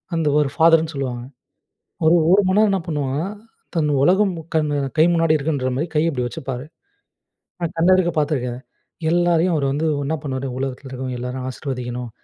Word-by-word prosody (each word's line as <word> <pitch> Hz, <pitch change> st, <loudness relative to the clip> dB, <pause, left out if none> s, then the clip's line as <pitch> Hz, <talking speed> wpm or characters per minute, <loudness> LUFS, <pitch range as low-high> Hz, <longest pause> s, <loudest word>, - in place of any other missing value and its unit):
அந்த 165 Hz, -2 st, 0 dB
ஒரு 145 Hz, -2 st, +1 dB
ஃபாதர்ன்னு 165 Hz, -1 st, +4 dB
சொல்லுவாங்க. 125 Hz, -3 st, -3 dB, 0.8 s
ஒரு 160 Hz, +2 st, +6 dB, 0.2 s
1 200 Hz, +2 st, +6 dB
மணி 185 Hz, +2 st, +2 dB
நேரம் 215 Hz, -1 st, +4 dB
என்ன 195 Hz, -, +1 dB
பண்ணுவாங்கன்னா, 145 Hz, +1 st, -2 dB, 0.5 s
தன் 155 Hz, -3 st, +1 dB
உலகம் 190 Hz, +4 st, +3 dB, 0.2 s
கண் 155 Hz, -1 st, +2 dB, 0.3 s
கை 155 Hz, -, +6 dB
முன்னாடி 165 Hz, -2 st, +3 dB
இருக்குன்ற 140 Hz, -3 st, -1 dB
மாரி, 155 Hz, +5 st, -1 dB
கை 150 Hz, -, +3 dB
இப்படி 125 Hz, -6 st, -2 dB
வச்சுப்பாரு. 130 Hz, +2 st, -6 dB, 1.0 s
நான் 170 Hz, -2 st, -3 dB
கண்ணெதிர்க்க 175 Hz, +1 st, +3 dB
பார்த்துருக்கேன். 130 Hz, -5 st, -1 dB, 0.5 s
எல்லாரையும் 175 Hz, 0 st, +2 dB
அவர் 140 Hz, -2 st, 0 dB
வந்து 150 Hz, +3 st, -1 dB, 0.2 s
என்னா 155 Hz, +3 st, -1 dB
பண்ணுவாரு? 135 Hz, -1 st, -3 dB
உலகத்தில 135 Hz, 0 st, -4 dB
இருக்கிறவங்க 130 Hz, -1 st, -5 dB
எல்லாரையும் 125 Hz, +1 st, -4 dB
ஆசீர்வதிக்கணும். 125 Hz, -2 st, -5 dB
150 Hz, 155 wpm, -21 LUFS, 130-165 Hz, 1.0 s, ஒரு